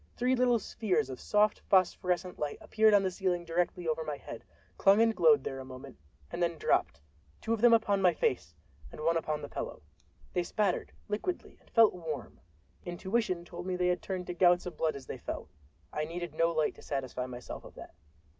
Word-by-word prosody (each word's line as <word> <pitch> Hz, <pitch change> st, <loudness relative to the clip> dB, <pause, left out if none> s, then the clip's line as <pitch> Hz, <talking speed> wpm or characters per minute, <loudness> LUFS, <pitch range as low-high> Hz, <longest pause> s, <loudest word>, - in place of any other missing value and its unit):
Three 250 Hz, +2 st, +2 dB
little 245 Hz, -1 st, +3 dB
spheres 195 Hz, -, -1 dB
of 130 Hz, -, -7 dB
soft 210 Hz, 0 st, +2 dB
phosphorescent 180 Hz, -1 st, +2 dB
light 150 Hz, -1 st, -2 dB
appeared 220 Hz, -1 st, +4 dB
on 200 Hz, -, +4 dB
the 190 Hz, -, 0 dB
ceiling 180 Hz, -2 st, -1 dB
directly 175 Hz, +1 st, -1 dB
over 160 Hz, 0 st, 0 dB
my 150 Hz, -2 st, -4 dB
head, 115 Hz, -, -9 dB, 0.3 s
clung 200 Hz, +2 st, +5 dB
and 225 Hz, -1 st, +4 dB
glowed 460 Hz, -2 st, +5 dB
there 135 Hz, -, -4 dB
a -, -, -6 dB
moment, 130 Hz, -, -11 dB, 0.3 s
and -, -, -4 dB
then 170 Hz, -1 st, +1 dB
dropped—two 75 Hz, -, -2 dB
of 225 Hz, -, -2 dB
them 240 Hz, 0 st, +7 dB
upon 210 Hz, -4 st, +3 dB
my 180 Hz, -3 st, +4 dB
face 85 Hz, -, -1 dB, 0.4 s
and -, -, -9 dB
one 165 Hz, +2 st, +2 dB
upon 155 Hz, -2 st, -2 dB
the -, -, -4 dB
pillow. 75 Hz, -, -6 dB, 0.5 s
They 180 Hz, -, +1 dB
spattered, 190 Hz, +1 st, -1 dB, 0.2 s
liquidly, 220 Hz, -, -4 dB
and -, -, -25 dB
felt 225 Hz, -2 st, +6 dB
warm. 155 Hz, -, -6 dB, 0.4 s
Intuition 185 Hz, 0 st, -1 dB
told 175 Hz, +1 st, -8 dB
me 185 Hz, -, -1 dB
they 180 Hz, 0 st, +1 dB
had 180 Hz, -2 st, 0 dB
turned 185 Hz, -2 st, -4 dB
to 180 Hz, -, -4 dB
gouts 175 Hz, 0 st, +4 dB
of 180 Hz, -, -6 dB
blood 160 Hz, -1 st, 0 dB
as 140 Hz, -, -9 dB
they -, -, -7 dB
fell—I 75 Hz, -, -7 dB
needed 170 Hz, 0 st, -5 dB
no 165 Hz, +2 st, +2 dB
light 155 Hz, -2 st, +1 dB
to -, -, -13 dB
satisfy 130 Hz, -2 st, -3 dB
myself 125 Hz, -1 st, -8 dB
of -, -, -13 dB
that. -, -, -11 dB
175 Hz, 200 wpm, -31 LUFS, 150-200 Hz, 0.5 s, them